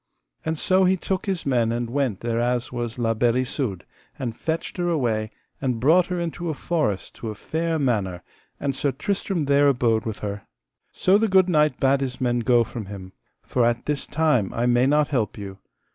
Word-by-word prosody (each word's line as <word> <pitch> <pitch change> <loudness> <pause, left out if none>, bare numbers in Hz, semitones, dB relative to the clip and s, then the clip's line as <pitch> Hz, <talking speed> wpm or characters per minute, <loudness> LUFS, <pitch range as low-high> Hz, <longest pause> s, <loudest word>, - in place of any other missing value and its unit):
And 160 0 -2
so 185 +4 +3
he 185 +1 +3
took 190 +2 -3
his 190 -4 -2
men 120 -4 +2
and 120 0 -2
went 125 -5 -1
thereas 120 +1 -1
was 120 -1 -4
La 115 -2 +1
Beale 115 +1 +2
Isoud, 125 - -1 0.3
and 120 -4 -4
fetched 160 +7 -3
her 175 -1 0
away, 115 -9 0 0.3
and 125 -4 -1
brought 165 +8 +4
her 180 -1 -2
into 170 0 -3
a 155 - -2
forest 150 - -1
to 115 - -5
a 105 - -5
fair 160 +8 -2
manor, 105 - -1 0.4
and 140 -2 -1
Sir 140 +1 0
Tristram 195 - -2
there 140 0 +4
abode 120 -5 +2
with 110 - -3
her. 100 0 -4 0.5
So 195 +2 +3
the 225 - +2
good 190 -2 +4
knight 150 -5 +2
bade 135 +1 +3
his 130 -2 -3
men 120 -2 +1
go 120 0 +4
from 115 -3 -7
him: 95 -2 -9 0.3
For 125 - 0
at 120 +1 +1
this 150 -2 -2
time 150 -10 +1
I 120 - 0
may 125 +1 +3
not 150 +1 +3
help 120 -8 -1
you. 100 -2 -8
130 Hz, 200 wpm, -24 LUFS, 115-160 Hz, 0.5 s, brought